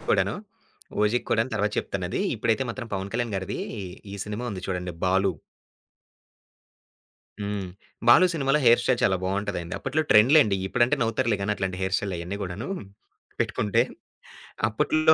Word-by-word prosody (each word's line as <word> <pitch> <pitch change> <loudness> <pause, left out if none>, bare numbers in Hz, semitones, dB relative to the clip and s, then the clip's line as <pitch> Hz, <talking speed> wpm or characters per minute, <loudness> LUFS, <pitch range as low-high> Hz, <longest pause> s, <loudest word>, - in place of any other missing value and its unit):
కూడాను. - - +1 0.7
'ఓజి' 110 +4 +2
కూడాను 115 +2 +1
తరువాత 105 0 0
చెప్తాను - - -3
అది - - -1
ఇప్పుడైతే 115 +3 +1
మాత్రం 120 -1 -6
పవన్ 95 +1 -3
కళ్యాణ్ 115 -3 -1
గారిది 95 +1 -4 0.6
ఈ - - -5
సినిమా 105 +3 -4
ఉంది 95 - -6
చూడండి 90 -1 -3
'బాలు.' 95 -2 +2 2.0
హ్మ్. 100 -2 -3 0.4
'బాలు' 175 +10 +7
సినిమాలో 145 -1 +2
హెయిర్ 120 0 +6
స్టైల్ 125 0 +1
చాలా 95 -1 +3
బాగుంటదండి. 95 -2 -2
అప్పట్లో 140 +4 0
ట్రెండ్ 110 +6 +6
లేండి. 105 -10 +5
ఇప్పుడంటే 120 +6 +2
నవ్వుతారులే 115 -1 +1
గాని 105 +2 +1
అట్లాంటి 95 -1 -3
హెయిర్ 95 +1 +1
స్టైల్ 100 -3 -3
అయన్నీ 90 +4 -5
గూడాను. 95 +4 -5 0.7
పెట్టుకుంటే, 105 - +1 0.9
అప్పట్లో 155 +8 +3
105 Hz, 145 wpm, -26 LUFS, 95-120 Hz, 2.0 s, బాలు